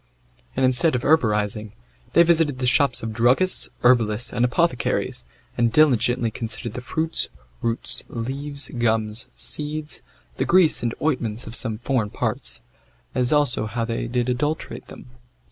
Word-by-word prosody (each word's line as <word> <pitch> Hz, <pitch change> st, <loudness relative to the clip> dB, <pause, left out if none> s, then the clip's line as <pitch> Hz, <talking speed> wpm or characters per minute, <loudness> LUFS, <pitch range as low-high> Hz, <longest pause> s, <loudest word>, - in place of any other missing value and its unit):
And, 130 Hz, -, +2 dB
instead 130 Hz, +4 st, +2 dB
of 125 Hz, -, -2 dB
herborizing, 105 Hz, -7 st, +1 dB, 0.4 s
they 170 Hz, -, +7 dB
visited 165 Hz, -5 st, +2 dB
the 130 Hz, -, -2 dB
shops 140 Hz, +1 st, +2 dB
of 110 Hz, -1 st, -4 dB
druggists, 125 Hz, +11 st, +2 dB
herbalists, 120 Hz, -2 st, +2 dB
and 120 Hz, 0 st, 0 dB
apothecaries, 130 Hz, +3 st, 0 dB, 0.3 s
and 120 Hz, -1 st, +1 dB
diligently 125 Hz, -5 st, +3 dB
considered 115 Hz, 0 st, -5 dB
the 125 Hz, -, -6 dB
fruits, 160 Hz, +6 st, 0 dB, 0.3 s
roots, 115 Hz, 0 st, 0 dB
leaves, 140 Hz, +4 st, -4 dB
gums, 110 Hz, -1 st, 0 dB
seeds, 150 Hz, 0 st, -3 dB, 0.4 s
the -, -, 0 dB
grease 180 Hz, -3 st, +3 dB
and 120 Hz, -1 st, -2 dB
ointments 120 Hz, -7 st, -1 dB
of 110 Hz, -, -9 dB
some 115 Hz, -2 st, 0 dB
foreign 120 Hz, -2 st, -1 dB
parts, -, -, +1 dB, 0.5 s
as 125 Hz, -1 st, +2 dB
also 145 Hz, -7 st, +3 dB
how 115 Hz, +2 st, -3 dB
they 115 Hz, 0 st, -3 dB
did 120 Hz, 0 st, -1 dB
adulterate 145 Hz, +5 st, -3 dB
them. -, -, -12 dB
125 Hz, 145 wpm, -22 LUFS, 115-145 Hz, 0.5 s, they